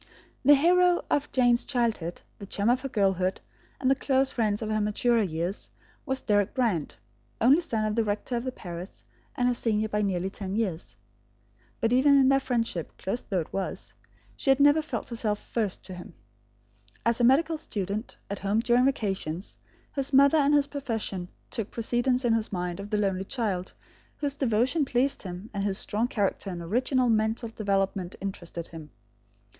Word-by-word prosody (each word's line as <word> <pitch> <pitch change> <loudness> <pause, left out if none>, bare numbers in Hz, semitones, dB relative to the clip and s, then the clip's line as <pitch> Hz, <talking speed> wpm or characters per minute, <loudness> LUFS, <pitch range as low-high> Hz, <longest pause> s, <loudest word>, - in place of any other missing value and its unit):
The 290 +2 +8
hero 355 +4 +4
of 290 0 +1
Jane's 245 -2 +3
childhood, 230 -10 -1 0.2
the 200 - -8
chum 205 +4 +1
of 255 +1 +1
her 270 - -4
girlhood 190 -4 +1 0.4
and 260 0 +2
the - - +7
close 270 0 +1
friend 215 -3 0
of 220 -1 -3
her 215 0 +1
maturer 225 +3 +2
years, 175 0 -3 0.4
was 265 -1 -1
Deryck 205 -2 +1
Brand, 225 - 0 0.4
only 270 +9 +5
son 225 -10 -1
of 215 - 0
the 230 - +2
rector 210 +4 -2
of 235 - -1
the 255 - -3
parish, 175 -4 -9 0.3
and 245 -2 +1
her 250 - +3
senior 220 -2 0
by 210 0 0
nearly 190 -2 -1
ten 195 -1 -5
years. 190 -7 -3 0.8
But 230 0 +1
even 280 +3 +5
in 265 -1 +5
their 275 0 +5
friendship, 230 - -2
close 215 +6 -3
though 190 -4 -1
it 155 - -10
was, 195 -1 -4 0.4
she 275 - -2
had 270 0 +5
never 290 +2 +6
felt 310 - -5
herself 225 -3 -1
first 210 -3 -3
to 185 - -8
him. 175 -1 -10 0.9
As 235 +1 +2
a - - +3
medical 305 +6 +4
student, 210 - -4
at 200 - -5
home 200 +3 +1
during 240 +1 +3
vacations, 195 - -2 0.3
his 275 -1 -1
mother 280 +3 +6
and 290 +1 +4
his 290 -1 +4
profession 225 -10 -3 0.2
took 225 -2 -3
precedence 245 +2 0
in 235 - +3
his 225 -1 0
mind 180 -1 -3
of 200 +1 -7
the 210 - 0
lonely 195 -2 0
child, 195 -7 -2 0.5
whose 285 -2 -2
devotion 260 +4 +1
pleased 270 +1 0
him 185 +3 -8
and 200 - -2
whose 195 -1 -1
strong 220 +3 0
character 200 -3 -1
and 175 -2 -5
original 250 +7 +1
mental 220 +1 +1
development 195 -4 -1
interested 175 -3 -6
him. 160 -2 -10
225 Hz, 180 wpm, -27 LUFS, 195-260 Hz, 0.9 s, The